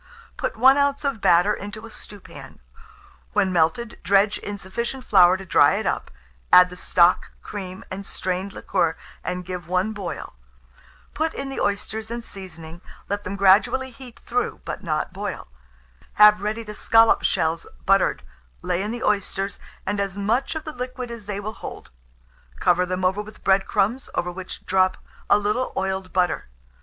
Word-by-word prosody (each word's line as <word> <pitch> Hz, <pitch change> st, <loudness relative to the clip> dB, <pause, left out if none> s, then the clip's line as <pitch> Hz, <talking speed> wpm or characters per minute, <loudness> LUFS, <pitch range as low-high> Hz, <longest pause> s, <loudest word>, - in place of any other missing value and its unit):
Put -, -, -3 dB
1 265 Hz, +4 st, +6 dB
oz. 280 Hz, 0 st, +1 dB
of 275 Hz, -7 st, -1 dB
batter 175 Hz, +4 st, +4 dB
into 210 Hz, +3 st, -7 dB
a 225 Hz, -, -11 dB
stewpan; 205 Hz, -1 st, -11 dB, 0.7 s
when 195 Hz, -3 st, +2 dB
melted, 175 Hz, +8 st, +1 dB
dredge 200 Hz, +1 st, +3 dB
in 205 Hz, 0 st, -5 dB
sufficient 235 Hz, +7 st, -4 dB
flour 185 Hz, -5 st, +6 dB
to 190 Hz, -, -9 dB
dry -, -, +5 dB
it -, -, -2 dB
up; -, -, -1 dB, 0.4 s
add 180 Hz, 0 st, +8 dB
the -, -, -8 dB
stock, 180 Hz, 0 st, +3 dB
cream, 190 Hz, -2 st, -7 dB
and 190 Hz, +1 st, -5 dB
strained 190 Hz, 0 st, -3 dB
liquor, -, -, 0 dB, 0.3 s
and 180 Hz, 0 st, -4 dB
give 180 Hz, -2 st, -6 dB
one 185 Hz, +4 st, 0 dB
boil. 195 Hz, -5 st, -6 dB, 0.8 s
Put 320 Hz, +1 st, -1 dB
in 275 Hz, 0 st, -4 dB
the 270 Hz, -, -5 dB
oysters 215 Hz, +2 st, -2 dB
and 235 Hz, 0 st, -5 dB
seasoning; 170 Hz, -5 st, -10 dB, 0.3 s
let 205 Hz, +1 st, -2 dB
them 200 Hz, -, -4 dB
gradually 200 Hz, +7 st, +4 dB
heat 245 Hz, -1 st, -13 dB
through, 245 Hz, 0 st, -2 dB
but -, -, -5 dB
not 155 Hz, 0 st, -2 dB
boil. 205 Hz, +2 st, -5 dB, 0.7 s
Have 210 Hz, -1 st, +7 dB
ready 215 Hz, +2 st, -2 dB
the 210 Hz, -1 st, -8 dB
scallop 225 Hz, +1 st, +4 dB
shells 160 Hz, +1 st, 0 dB, 0.2 s
buttered; 195 Hz, 0 st, +3 dB, 0.4 s
lay 175 Hz, -, 0 dB
in 205 Hz, -, -3 dB
the 235 Hz, +1 st, -4 dB
oysters, 200 Hz, -1 st, -1 dB, 0.3 s
and 205 Hz, +1 st, -1 dB
as 200 Hz, -1 st, -2 dB
much 225 Hz, +9 st, 0 dB
of 315 Hz, -, -4 dB
the 305 Hz, -, -6 dB
liquid 250 Hz, -1 st, -5 dB
as 225 Hz, -3 st, -9 dB
they 205 Hz, -1 st, -3 dB
will 215 Hz, +2 st, -5 dB
hold; -, -, -9 dB, 0.7 s
cover 180 Hz, +1 st, +3 dB
them 185 Hz, 0 st, -2 dB
over 190 Hz, +3 st, +1 dB
with 210 Hz, +1 st, -13 dB
bread 195 Hz, 0 st, +3 dB
crumbs, 235 Hz, +7 st, 0 dB
over 180 Hz, 0 st, -1 dB
which 185 Hz, +1 st, -8 dB
drop 185 Hz, 0 st, +2 dB, 0.3 s
a -, -, +6 dB
little 210 Hz, +5 st, -1 dB
oiled 190 Hz, -1 st, -2 dB
butter. 180 Hz, -1 st, 0 dB
200 Hz, 170 wpm, -23 LUFS, 185-225 Hz, 0.8 s, add